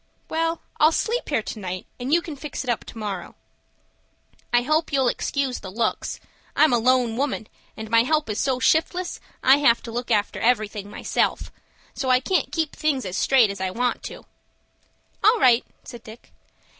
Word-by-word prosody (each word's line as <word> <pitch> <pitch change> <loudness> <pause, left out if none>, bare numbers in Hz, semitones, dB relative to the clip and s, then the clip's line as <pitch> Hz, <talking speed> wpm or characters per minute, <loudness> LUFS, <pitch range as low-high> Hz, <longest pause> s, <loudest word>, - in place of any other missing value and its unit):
"Well, 330 +1 -1 0.2
I'll 310 +1 +6
sleep 465 +8 -1
here 220 - 0
to 215 - -6
night, 185 -2 -5
and 250 +3 -4
you 340 +2 +3
can 315 - -7
fix 285 0 -6
it 250 - 0
up 235 - -3
to - - -11
morrow." 205 -4 -5 1.2
"I 240 0 +3
hope 310 +5 +1
you'll 270 -2 +2
excuse 270 +1 -1
the 190 - -8
looks. 225 +3 -2 0.4
I'm 310 -4 +5
a 240 - +4
lone 245 -1 +2
woman, 265 -4 -1 0.3
and 220 0 -6
my 230 +1 +4
help 305 +5 +1
is 210 -1 -3
so 265 -2 0
shiftless, 350 +5 +1 0.2
I 265 +2 +7
have 240 -5 +3
to 230 - -7
look 245 +2 -4
after 205 0 +1
everything 215 -3 0
myself; - - -1 0.4
so 265 -1 -3
I 255 0 +5
can't 365 +8 0
keep 320 -3 -2
things 285 -6 0
as 185 -1 -4
straight 245 -6 +4
as 200 - -7
I 190 - 0
want 245 +6 -1
to." - - -8 1.0
"All 440 +2 +5
right!" 245 - +5 0.2
said 240 -2 -10
Dick. 220 +1 -14
250 Hz, 185 wpm, -23 LUFS, 225-295 Hz, 1.2 s, I